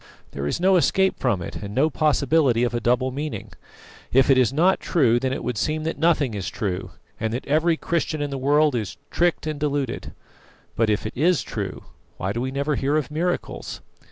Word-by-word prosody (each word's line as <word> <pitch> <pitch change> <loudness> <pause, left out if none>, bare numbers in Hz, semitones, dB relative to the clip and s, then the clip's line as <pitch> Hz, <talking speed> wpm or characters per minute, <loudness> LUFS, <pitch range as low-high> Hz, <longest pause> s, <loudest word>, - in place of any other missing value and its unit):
There 70 0 -4
is - - -1
no 185 +1 +4
escape 190 +2 +2
from 105 -9 0
it, - - -6
and 100 0 -7
no 155 +4 +3
possibility 145 -5 +2
of 120 0 0
a 120 - 0
double 125 +2 +1
meaning. 145 +3 -5 0.6
If 135 +2 +5
it 135 - +5
is 125 -4 +3
not 175 +7 +3
true, 125 -9 +2
then 130 +1 -1
it - - -3
would 120 -2 -2
seem 155 +3 -1
that 160 -2 -3
nothing 155 -6 +2
is 100 -3 -3
true, 95 -4 -3 0.3
and 110 0 -1
that 125 - -5
every 160 +3 +2
Christian 165 -2 -1
in 145 -1 -2
the 135 - -3
world 145 +2 +3
is 110 -6 -3
tricked 175 -2 +1
and 155 -2 -3
deluded. 145 -4 -2 0.6
But 115 -1 +2
if 105 0 0
it 110 - -4
is 165 +5 +2
true, - - -5 0.3
why 95 +2 -2
do 120 - -2
we 130 - -1
never 140 +3 -1
hear 140 +3 +1
of 150 -2 -2
miracles? 175 +4 -3
140 Hz, 210 wpm, -23 LUFS, 120-155 Hz, 0.6 s, If